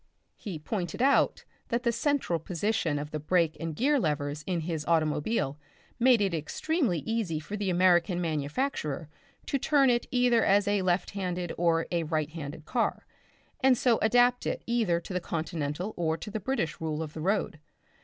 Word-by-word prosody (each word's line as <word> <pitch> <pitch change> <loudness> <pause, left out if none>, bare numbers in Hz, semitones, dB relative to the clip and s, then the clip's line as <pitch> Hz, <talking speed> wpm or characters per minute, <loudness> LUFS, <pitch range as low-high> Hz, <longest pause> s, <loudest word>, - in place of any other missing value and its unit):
He 195 -7 -6
pointed 175 +6 -4
out 275 +1 +3 0.2
that 235 +1 -1
the 235 - +2
central 235 - 0
position 175 -1 -1
of 145 +1 -5
the 155 - -3
brake 165 +1 +1
and 165 -2 -4
gear 285 - +2
levers 150 - -2
in 175 -3 0
his 160 -2 -3
automobile 155 -1 +1 0.4
made 245 -2 +5
it 195 -3 +1
extremely 175 - -1
easy 215 -7 -1
for 155 +7 -6
the 205 -2 -2
American 180 0 +3
manufacturer 155 - -2 0.4
to 275 - -1
turn 275 -2 +4
it 240 0 +1
out - - -31
either 245 -2 +3
as 200 +1 +3
a 205 -1 +2
left 185 0 0
handed 180 -3 -3
or 165 -1 +2
a 170 -1 +1
right 155 -1 -1
handed 155 -1 -7
car, 240 +4 -1 0.5
and 260 -2 +4
so 240 -2 +3
adapt 245 +2 +3
it - - -2
either 225 -8 +1
to 180 - -8
the 180 - -1
Continental 165 +3 -3
or 160 -2 0
to 210 - -8
the 220 - -3
British 205 - -2
rule 160 0 -2
of 155 -1 -8
the 160 - -6
road. 190 -3 0
175 Hz, 180 wpm, -29 LUFS, 155-230 Hz, 0.5 s, made